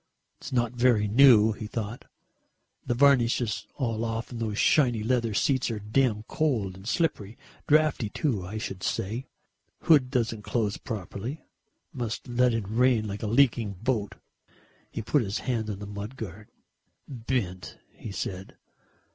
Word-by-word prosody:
"It's -, -, -8 dB
not 120 Hz, -3 st, +1 dB
very 120 Hz, -4 st, +3 dB
new," 110 Hz, -1 st, +6 dB
he 105 Hz, 0 st, -6 dB
thought, 110 Hz, +1 st, -5 dB, 0.8 s
"the 120 Hz, -, -1 dB
varnish 125 Hz, -3 st, +4 dB
is 115 Hz, -3 st, -3 dB
all 115 Hz, -4 st, -2 dB
off 115 Hz, +1 st, -3 dB
and 120 Hz, -, -6 dB
those 110 Hz, -2 st, -2 dB
shiny 120 Hz, -8 st, +3 dB
leather 115 Hz, -2 st, 0 dB
seats 130 Hz, +2 st, +1 dB
are 115 Hz, -, -3 dB
damned 110 Hz, +1 st, 0 dB
cold 115 Hz, -12 st, 0 dB
and 95 Hz, +2 st, -12 dB
slippery, 120 Hz, -, -1 dB, 0.3 s
draughty 150 Hz, -7 st, +3 dB
too, 110 Hz, -4 st, -1 dB
I 100 Hz, +4 st, -6 dB
should 95 Hz, -3 st, -5 dB
say; 115 Hz, +10 st, -2 dB, 0.6 s
hood 145 Hz, -6 st, +5 dB
doesn't 115 Hz, -4 st, -1 dB
close 105 Hz, -1 st, -1 dB
properly. 110 Hz, -, -6 dB, 0.5 s
Must 120 Hz, -4 st, -4 dB
let 125 Hz, 0 st, +3 dB
in 115 Hz, -2 st, -1 dB
the 95 Hz, -, -10 dB
rain 115 Hz, -1 st, +2 dB
like 100 Hz, 0 st, -5 dB
a 110 Hz, -, -2 dB
leaking 115 Hz, -3 st, +3 dB
boat." 110 Hz, +1 st, -2 dB, 0.7 s
He 115 Hz, -, -5 dB
put 140 Hz, +6 st, +2 dB
his 100 Hz, -1 st, -2 dB
hand 115 Hz, -4 st, -1 dB
on 100 Hz, -, -3 dB
the 105 Hz, -, -7 dB
mud 105 Hz, +4 st, -7 dB
guard. 105 Hz, -1 st, -8 dB, 0.6 s
"Bent," 115 Hz, -8 st, -3 dB
he 110 Hz, -, -9 dB
said. 95 Hz, -1 st, -5 dB
115 Hz, 155 wpm, -27 LUFS, 105-125 Hz, 0.8 s, new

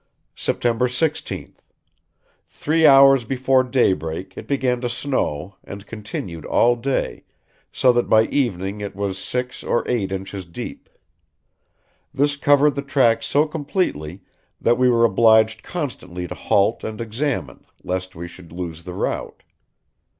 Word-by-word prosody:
"September 120 Hz, +1 st, 0 dB
16th. 150 Hz, +6 st, -3 dB, 0.9 s
Three 160 Hz, +1 st, +2 dB
hours 135 Hz, -2 st, +7 dB
before 130 Hz, +2 st, +2 dB
daybreak 95 Hz, -, 0 dB
it -, -, -9 dB
began 130 Hz, -3 st, 0 dB
to 120 Hz, -, -1 dB
snow, 95 Hz, -, -2 dB
and 100 Hz, 0 st, -9 dB
continued 100 Hz, -6 st, -7 dB
all 120 Hz, +9 st, +3 dB
day, 130 Hz, +3 st, -2 dB, 0.5 s
so 125 Hz, -1 st, +3 dB
that 120 Hz, 0 st, 0 dB
by 110 Hz, 0 st, +6 dB
evening 105 Hz, -6 st, -1 dB
it 100 Hz, -2 st, -6 dB
was 100 Hz, -1 st, -3 dB
six 125 Hz, 0 st, -4 dB
or -, -, 0 dB
eight 105 Hz, -6 st, -1 dB
inches 95 Hz, 0 st, -5 dB
deep. 85 Hz, -1 st, -8 dB, 1.2 s
This 145 Hz, +1 st, +1 dB
covered 145 Hz, 0 st, +4 dB
the 140 Hz, -, -3 dB
track 125 Hz, -5 st, +2 dB
so 145 Hz, +6 st, +2 dB
completely 145 Hz, -, -3 dB, 0.4 s
that 120 Hz, +1 st, +2 dB
we 130 Hz, 0 st, +4 dB
were 115 Hz, -1 st, +4 dB
obliged 110 Hz, 0 st, +4 dB
constantly 90 Hz, -, -5 dB
to -, -, -6 dB
halt 100 Hz, +3 st, +1 dB
and 110 Hz, -1 st, -5 dB
examine, 115 Hz, -, -3 dB, 0.2 s
lest 95 Hz, 0 st, -4 dB
we 85 Hz, +1 st, -6 dB
should 85 Hz, -1 st, -14 dB
lose 85 Hz, -1 st, -6 dB
the 90 Hz, -1 st, -7 dB
route. -, -, -3 dB
115 Hz, 135 wpm, -21 LUFS, 95-135 Hz, 1.2 s, hours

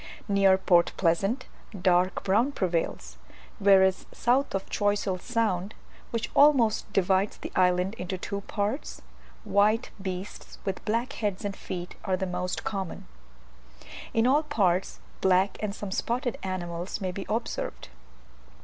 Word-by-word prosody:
Near 195 Hz, -2 st, +4 dB
Port 175 Hz, -2 st, +3 dB
Pleasant 195 Hz, +8 st, +1 dB, 0.3 s
dark 180 Hz, 0 st, +2 dB
brown 225 Hz, +9 st, +2 dB
prevails, 165 Hz, -, -2 dB, 0.4 s
whereas 190 Hz, -1 st, +4 dB
south 255 Hz, 0 st, +1 dB
of 195 Hz, -, -3 dB
Choiseul 205 Hz, -2 st, 0 dB
Sound 215 Hz, -4 st, -1 dB, 0.3 s
(which 230 Hz, -1 st, -3 dB
almost 255 Hz, -8 st, +4 dB
divides 195 Hz, +1 st, +2 dB
the -, -, -7 dB
island 180 Hz, +1 st, +3 dB
into 185 Hz, +1 st, -3 dB
two 200 Hz, +2 st, -4 dB
parts), 210 Hz, +7 st, -3 dB, 0.4 s
white 215 Hz, +4 st, +2 dB
beasts 190 Hz, +1 st, -6 dB
with 195 Hz, -2 st, -3 dB
black 230 Hz, +5 st, -1 dB
heads 205 Hz, -2 st, -2 dB
and 200 Hz, -1 st, -3 dB
feet 180 Hz, -2 st, -6 dB
are 185 Hz, -1 st, 0 dB
the 190 Hz, -, -2 dB
most 180 Hz, 0 st, -3 dB
common: 195 Hz, -4 st, -4 dB, 1.1 s
in 225 Hz, 0 st, +2 dB
all 275 Hz, +4 st, +4 dB
parts 195 Hz, -, 0 dB, 0.2 s
black, 190 Hz, +1 st, +3 dB
and 210 Hz, -1 st, -3 dB
some 205 Hz, -2 st, -6 dB
spotted 245 Hz, +4 st, -1 dB
animals 175 Hz, -1 st, -4 dB
may 190 Hz, -3 st, -2 dB
be 195 Hz, +1 st, -6 dB
observed. 225 Hz, -, -3 dB
195 Hz, 130 wpm, -27 LUFS, 185-220 Hz, 1.1 s, Near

